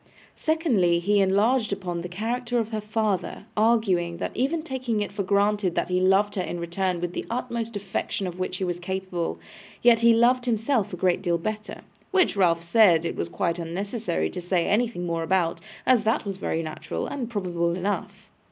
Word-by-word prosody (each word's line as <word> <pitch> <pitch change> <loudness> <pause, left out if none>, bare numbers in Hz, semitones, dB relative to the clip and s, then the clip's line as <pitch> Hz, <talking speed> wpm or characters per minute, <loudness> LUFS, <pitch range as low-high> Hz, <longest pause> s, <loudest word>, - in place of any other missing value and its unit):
Secondly, 245 - +2
he 200 +4 +2
enlarged 210 +5 +2
upon 180 -3 -3
the 175 - -6
character 235 +6 -2
of 225 -1 -1
her 215 -1 -2
father, 210 -3 -2
arguing, 205 -7 +2
that - - -3
even 300 +6 0
taking 255 -7 -2
it 205 -1 -2
for 200 0 -3
granted 200 -1 +1
that - - 0
he 180 0 +2
loved 195 +2 +3
her 195 - -1
in 175 -1 -4
return 175 +1 -1
with 175 0 -3
the - - -3
utmost 235 -2 -3
affection 195 0 -3
of 180 0 -5
which 185 0 -2
he 190 - -3
was 175 -1 -2
capable, 185 -1 -3 0.5
yet 235 -1 +6
he 235 0 +6
loved 245 +2 +3
himself 225 -2 +1
a 180 - -5
great 180 0 +1
deal 175 -3 +1
better; 215 +4 -5 0.3
which 380 - +3
Ralph 170 -4 +3
said 170 -2 +5
it 170 - -2
was 85 - -3
quite 170 - -1
unnecessary 175 - -2
to - - -5
say 175 -1 +1
anything 220 -4 0
more 165 -1 -1
about, 170 0 +1 0.3
as 255 -3 +5
that 220 0 +1
was 195 -2 -4
very 165 -3 -2
natural, 155 -1 -4
and 250 -5 -4
probable 175 -6 -1
enough. 200 +3 -4
200 Hz, 190 wpm, -25 LUFS, 175-225 Hz, 0.5 s, yet